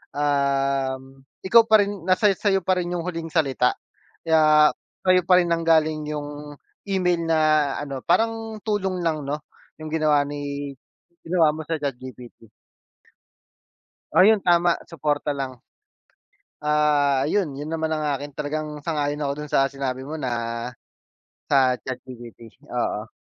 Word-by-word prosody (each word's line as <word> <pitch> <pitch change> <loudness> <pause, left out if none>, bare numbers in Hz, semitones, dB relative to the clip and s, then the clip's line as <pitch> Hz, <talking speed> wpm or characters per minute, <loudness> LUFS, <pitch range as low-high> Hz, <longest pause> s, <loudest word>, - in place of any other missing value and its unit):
um, 135 -2 0 0.2
ikaw 230 +5 +6
pa 220 -2 +6
rin 200 -3 -6
nasa-sayo 195 0 +2
pa 185 +1 +1
rin 175 -1 -3
yung 170 -1 -3
huling 165 -2 -4
salita 135 -6 +1 0.5
kaya, 155 -2 +5 0.3
sayo 185 0 +5
pa 180 +1 +5
rin 180 - +3
nang-galing 160 -2 +2
yung 145 -1 -6 0.3
email 180 -3 +1
na 160 -1 +3 0.4
ano, 140 -2 -5
parang 225 - 0
tulong 190 -4 -1
lang 155 -2 0
no 145 +1 -3 0.4
yung 155 0 -8
ginawa 150 -2 +3
ni 145 -1 -5 0.5
ginawa 165 -3 +2
mo 160 - -6
sa 165 - 0
ChatGPT. 125 -5 -8 1.6
Oh, - - +6
yun 215 +3 +6
tama 175 -1 +4
suporta 150 -2 -2
lang. 135 -2 -5 1.0
Ah, 150 -2 +2
ayun 185 +4 +1
yun, 145 +2 -6
naman 160 -1 -1
ang 155 -1 -1
akin 145 +1 -5
talagang 150 +1 -3 0.2
sang-ayon 150 -2 -2
ako 140 -1 -1
dun 150 - -7
sa 135 - +3
sinabi 130 -2 -4
mo 155 +3 -6
na 130 -3 -2 1.2
sa 130 -2 +3
ChatGPT, 120 -3 -10 0.2
oo. 115 -3 -2
150 Hz, 135 wpm, -23 LUFS, 140-170 Hz, 1.6 s, ikaw